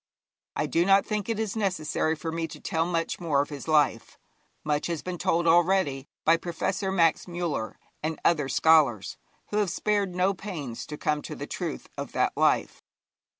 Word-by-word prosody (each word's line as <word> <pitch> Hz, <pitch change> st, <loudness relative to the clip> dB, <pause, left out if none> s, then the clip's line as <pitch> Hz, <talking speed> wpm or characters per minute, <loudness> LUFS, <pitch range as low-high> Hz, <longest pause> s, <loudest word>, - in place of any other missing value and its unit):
I -, -, 0 dB
do 170 Hz, -, +2 dB
not 195 Hz, +1 st, +4 dB
think 210 Hz, 0 st, -2 dB
it 225 Hz, -, 0 dB
is 220 Hz, -2 st, -2 dB
necessary 170 Hz, -6 st, 0 dB
for 160 Hz, +2 st, -5 dB
me 165 Hz, 0 st, -2 dB
to -, -, -10 dB
tell 165 Hz, +1 st, -1 dB
much 165 Hz, -2 st, -1 dB
more 160 Hz, -5 st, +1 dB
of 145 Hz, -, 0 dB
his 145 Hz, +1 st, -7 dB
life. 155 Hz, -2 st, +2 dB, 0.5 s
Much 150 Hz, -1 st, 0 dB
has 170 Hz, -3 st, -3 dB
been 180 Hz, -1 st, -5 dB
told 170 Hz, +1 st, +1 dB
already 170 Hz, -5 st, +3 dB, 0.2 s
by 165 Hz, +1 st, +5 dB
Professor 185 Hz, +3 st, -2 dB
Max 170 Hz, -3 st, +2 dB
Müller 170 Hz, -10 st, -3 dB, 0.3 s
and 155 Hz, +1 st, -3 dB
other 150 Hz, -5 st, +3 dB
scholars, 140 Hz, -6 st, +3 dB, 0.3 s
who 210 Hz, -, 0 dB
have 205 Hz, -3 st, +2 dB
spared 200 Hz, 0 st, 0 dB
no 185 Hz, +2 st, +2 dB
pains 165 Hz, -, -6 dB
to 150 Hz, -, -6 dB
come 150 Hz, 0 st, 0 dB
to -, -, -7 dB
the -, -, -6 dB
truth 65 Hz, -, -5 dB
of -, -, -5 dB
that -, -, +1 dB
life. -, -, +1 dB
165 Hz, 185 wpm, -27 LUFS, 150-190 Hz, 0.5 s, by